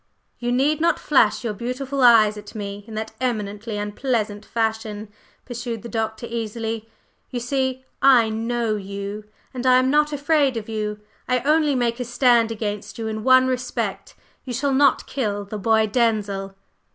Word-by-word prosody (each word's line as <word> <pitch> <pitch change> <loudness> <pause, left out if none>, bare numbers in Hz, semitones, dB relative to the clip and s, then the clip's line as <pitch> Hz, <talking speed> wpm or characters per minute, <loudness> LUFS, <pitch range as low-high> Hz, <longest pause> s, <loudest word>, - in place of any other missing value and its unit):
"You 240 0 -1
need 285 +5 +2
not 335 - +3
flash 250 -6 +2
your 225 -3 -2
beautiful 255 +5 -3
eyes 225 -4 +6
at 210 0 -11
me 200 -1 -5
in 220 - -8
that 220 0 -4
eminently 215 -3 -2
unpleasant 210 0 -2
fashion," 220 -2 -2 0.4
pursued 240 -2 -5
the 235 - -7
Doctor, 220 0 -3
easily. 225 -1 -4 0.4
"You 250 - -3
see 260 +1 -2 0.2
I 255 -4 +6
know 225 0 -1
you, 200 +1 -6 0.3
and 250 -1 -5
I 255 -1 +6
am 255 +1 +3
not 300 +1 +3
afraid 290 -3 +2
of 215 - -5
you. 210 -1 -3 0.3
I 250 -1 +1
only 300 +1 +3
make 240 -1 0
a 250 - -2
stand 240 -1 +3
against 210 -1 -4
you 225 - -4
in 220 0 -4
one 260 +1 +6
respect: 255 -1 -3 0.3
you 250 - -6
shall 275 +3 0
not 275 0 +3
kill 205 -6 -2
the 210 +1 -6
boy 220 +1 +3
Denzil." 205 -4 0
230 Hz, 165 wpm, -22 LUFS, 215-255 Hz, 0.4 s, eyes